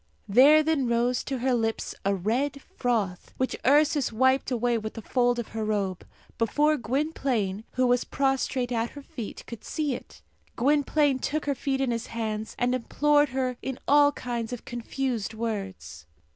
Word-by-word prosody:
There 280 +9 +7
then 305 -5 +1
rose 235 +1 +1
to 270 - -2
her 255 +1 +1
lips 225 -2 -1
a 200 0 +1
red 250 +9 -1 0.2
froth, 215 -8 -1
which 260 - -1
Ursus 290 0 +3
wiped 260 +4 +2
away 245 -1 +1
with 215 0 -6
the 225 - -6
fold 245 +1 +2
of 235 - -4
her 220 0 -4
robe, 200 -4 -2 0.3
before 295 +7 +3
Gwynplaine, 240 -6 -1
who 255 0 +2
was 245 0 +3
prostrate 270 -2 0
at 230 0 0
her 285 - -8
feet, 235 -5 -7
could 235 -2 -9
see 300 -4 -2
it. - - -10 0.3
Gwynplaine 285 +1 +2
took 305 +4 -2
her 285 - +1
feet 270 0 -2
in 265 -2 +1
his 230 0 -3
hands, 220 -1 -4
and 245 +1 +1
implored 290 +4 +2
her 255 -1 -2
in 265 -1 -4
all 290 0 +6
kinds 235 -3 -4
of 245 - -6
confused 240 -2 -3
words. 195 - -5
245 Hz, 170 wpm, -27 LUFS, 225-275 Hz, 0.3 s, There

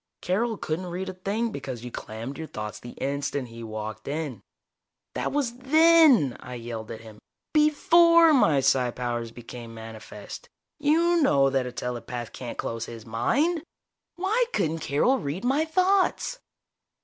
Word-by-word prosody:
Carol 220 +5 0
couldn't 165 +4 -3
read 180 +2 -4
a - - -5
thing 205 +5 -2
because 130 - -6
you 125 - -7
clammed 115 +7 -7
your 160 - -5
thoughts 105 -4 -6
the 120 - -10
instant 140 -2 -3
he 115 0 -10
walked 110 -1 -6
in." 145 -6 -4 0.7
"That - - -2
was 270 -5 -1
then!" 300 - +5
I 125 - -8
yelled 115 -2 -6
at 110 - -7
him. 110 -2 -13 0.3
"Before 330 +2 +6
my 160 - +4
psi 130 -1 +3
powers 120 -1 -3
became 115 0 -10
manifest. 110 -1 -9 0.3
You 330 +4 +3
know 140 - +4
that 130 -2 0
a - - -5
telepath 120 -1 -5
can't 120 -2 -7
close 115 0 -3
his 115 -2 -9
mind! 280 - +1 0.5
Why 415 +7 +1
couldn't 160 +1 0
Carol 200 - +2
read 170 +5 -4
my 280 +5 +2
thoughts?" 375 +8 +1
140 Hz, 150 wpm, -26 LUFS, -, 0.7 s, Before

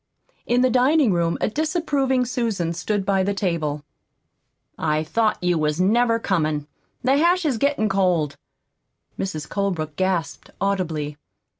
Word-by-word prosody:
In 245 +1 +3
the 255 0 +3
dining 260 -2 +4
room 170 -1 0
a - - +2
disapproving 285 - 0
Susan 225 -9 -1
stood 205 +3 -2
by 195 -1 +2
the 200 +1 0
table. 160 -7 -1 0.9
"I 155 -1 0
thought 215 +7 +1
you 175 -2 +2
wasn't 155 +6 +1
never 235 0 +3
comin'. 155 -9 -1 0.4
The 265 +2 +3
hash 345 +3 +3
is 260 -7 0
gettin' 280 -5 +1
cold." 180 -7 +1 0.8
Mrs. 155 -6 -3
Colebrook 175 -7 -2
gasped 185 -6 -1
audibly. 165 -7 -1
195 Hz, 135 wpm, -23 LUFS, 165-245 Hz, 0.9 s, dining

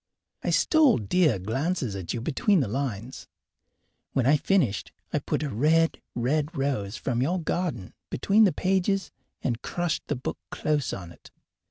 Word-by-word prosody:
I - - -2
stole 310 -5 +4
dear 140 - +2
glances 125 - -2
at 95 -3 -4
you 120 - -3
between 190 - +2
the 130 - 0
lines. 125 0 -4 0.9
When 130 - +1
I 140 +4 +6
finished 150 - +1 0.2
I - - +2
put - - -2
a 150 - -2
red, 160 +7 +2
red 145 +6 0
rose 120 -7 -1
from 125 -1 -1
your 175 +8 +1
garden 160 - -2 0.2
between 210 - +4
the 190 - +4
pages 190 +3 0 0.3
and 120 -2 -1
crushed 175 -3 -2
the 145 - -1
book 125 - -5
close 150 -2 -1
on 90 -3 -6
it. - - -16
140 Hz, 160 wpm, -27 LUFS, 115-175 Hz, 0.9 s, I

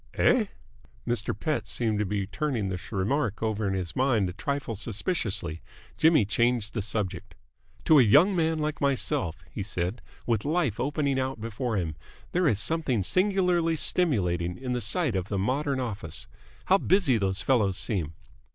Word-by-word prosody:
"Eh?" 240 -4 +3 0.6
Mr. 120 -2 -2
Pett 155 -2 -1
seemed 110 -3 -1
to 105 - 0
be 100 0 -1
turning 110 0 -2
this 90 0 -6
remark 110 +2 -1
over 110 -1 -1
in 95 - -1
his 85 -5 -3
mind 120 -7 +2
a - - -6
trifle 135 +7 -3
suspiciously. 105 - -2 0.3
Jimmy 160 -9 +4
changed 115 +1 0
the 115 - -1
subject. 105 -2 -4 0.5
"To 155 -2 +7
a - - +8
young 150 - +5
man 160 -2 +1
like 150 -1 -3
myself," 125 - +1
he - - -5
said, 95 +2 -3 0.2
"with 115 -3 0
life 150 - 0
opening 140 +1 0
out 130 -2 -2
before 115 +1 -3
him, 80 -5 -2 0.4
there 180 -1 +2
is 105 -8 +2
something 135 -5 +1
singularly 180 - +2
stimulating 90 - +1
in 125 -1 -3
the 125 - -1
sight 120 - +1
of 95 +1 -3
a 100 - 0
modern 135 +7 0
office. 95 - -5 0.4
How 195 +1 +4
busy 175 - +3
those 95 -1 0
fellows 105 -8 +2
seem!" 85 - -1
115 Hz, 165 wpm, -27 LUFS, 100-145 Hz, 0.6 s, a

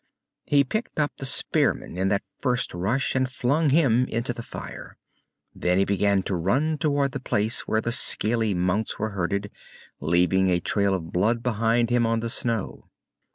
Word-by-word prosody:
He 140 -1 +4
picked 215 - -4
up 150 -1 +1
the 135 - -3
spearman 130 - 0
in 95 +1 0
that 100 0 0 0.2
first 125 -2 -1
rush 100 +10 0
and 130 -1 0
flung 140 +5 +1
him 130 -5 +3
into 120 +2 -2
the 115 - -7
fire. - - -9 0.6
Then 90 +1 0
he 100 - +3
began 100 -1 +1
to 100 - -3
run 135 - 0
toward 145 -3 +1
the 135 - -4
place 110 -2 -1
where 110 - +1
the 115 - -2
scaly 110 -3 +2
mounts 90 +5 -1
were 110 - -2
herded, 100 +2 -2 0.5
leaving 90 +4 +2
a 90 -1 +2
trail 100 +2 +1
of 85 -3 -6
blood 115 +6 +1
behind 115 0 +1
him 120 -1 +2
on 115 0 +1
the 115 0 -3
snow. 115 -4 -3
115 Hz, 175 wpm, -25 LUFS, 95-130 Hz, 0.6 s, He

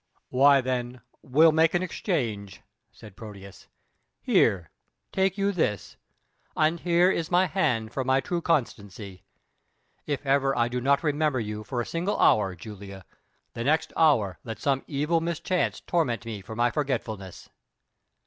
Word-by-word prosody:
"Why, 140 +1 +5
then, 125 -1 -3 0.2
we'll 155 +5 +4
make 160 +2 +3
an 175 - +1
exchange," 115 - -3 0.3
said 105 -3 -14
Proteus. 100 -3 -12 0.5
"Here, 90 -5 +2 0.4
take 190 0 0
you 200 0 +1
this. 130 - -2 0.6
And 160 +2 +2
here 175 +2 +3
is 165 -3 -2
my 180 +1 +4
hand 135 - -1
for 135 - -1
my 130 +1 +2
true 170 +6 -3
constancy. 100 - -3 0.8
If 145 -1 -3
ever 135 -1 +2
I 120 0 +2
do 125 0 -3
not 140 +3 +2
remember 150 -3 +1
you 105 -1 -5
for 120 +1 -3
a - - -4
single 175 +5 -2
hour, 95 -3 +3
Julia, 100 0 -10 0.5
the 115 - -4
next 155 +5 +1
hour 120 - +3
let 115 -2 -6
some 135 -2 0
evil 150 +3 0
mischance 170 +2 -1
torment 120 - -1
me 110 -3 -6
for 105 +3 -9
my 120 +1 +2
forgetfulness." 115 - -4
130 Hz, 150 wpm, -26 LUFS, 110-160 Hz, 0.8 s, Why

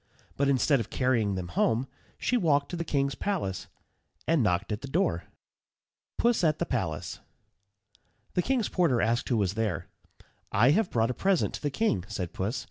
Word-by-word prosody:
But 140 0 +1
instead 140 +1 +3
of 115 - -4
carrying 115 -6 +1
them 90 -2 -4
home 115 +7 +1 0.3
she 250 - 0
walked 145 -10 +2
to - - -3
the 170 - -2
king's 140 -3 0
palace 145 - -2 0.6
and 165 -3 +3
knocked 100 -1 +1
at 105 - -2
the 140 - -6
door. 175 +8 0 0.9
PUSS 235 -5 +2
AT 155 -2 +3
THE 170 - -1
PALACE. 80 - -3 1.1
The 180 - +2
king's 245 0 +1
porter 165 -10 +2
asked 115 +3 +1
who 120 - +2
was 100 -3 +1
there. 110 -4 -2 0.6
"I 120 +7 +5
have 195 +4 +2
brought 115 +1 +1
a - - -3
present 190 +5 +1
to - - -6
the 145 - 0
king," 140 - 0
said 90 -4 -4
Puss. 105 +7 -2
130 Hz, 180 wpm, -28 LUFS, 105-165 Hz, 1.1 s, I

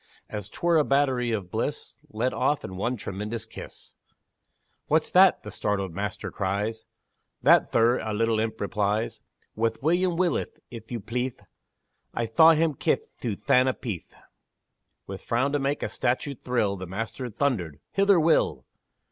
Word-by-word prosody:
As 105 -1 -6
'twere 170 +8 +1
a 155 - +5
battery 135 -4 +2
of 100 -5 -3
bliss - - -3
Let 115 +4 -1
off 145 - +1
in 95 - -7
one 120 +7 -1
tremendous 105 +3 -5
kiss! 115 - -11 0.9
"What's - - +2
that?" - - +6
the - - -7
startled 100 -4 -2
master 100 +1 -4
cries; 100 +4 -2 0.6
"That, - - +5
thir," 115 +2 +4
a 110 - -4
little 115 +1 +1
imp 110 0 -2
replies, 105 +1 -1 0.3
"Wath 115 +1 0
William 175 +2 +2
Willith, 180 -1 0
if 115 -1 -10
you 120 -3 -3
pleathe 125 +4 -3 0.8
I 120 - 0
thaw 160 +9 +6
him 160 0 +2
kith - - -1
Thuthanna 125 +3 +2
Peathe!" 100 -9 -6 0.9
With 95 0 -7
frown 130 +4 +1
to 145 - +1
make 140 +1 -1
a - - 0
statue 130 +3 -1
thrill, 120 -6 -1
The 95 0 -7
master 115 +6 -4
thundered, 105 - -1
"Hither, 195 -2 +4
Will!" 155 - +2
115 Hz, 150 wpm, -26 LUFS, 105-135 Hz, 0.9 s, that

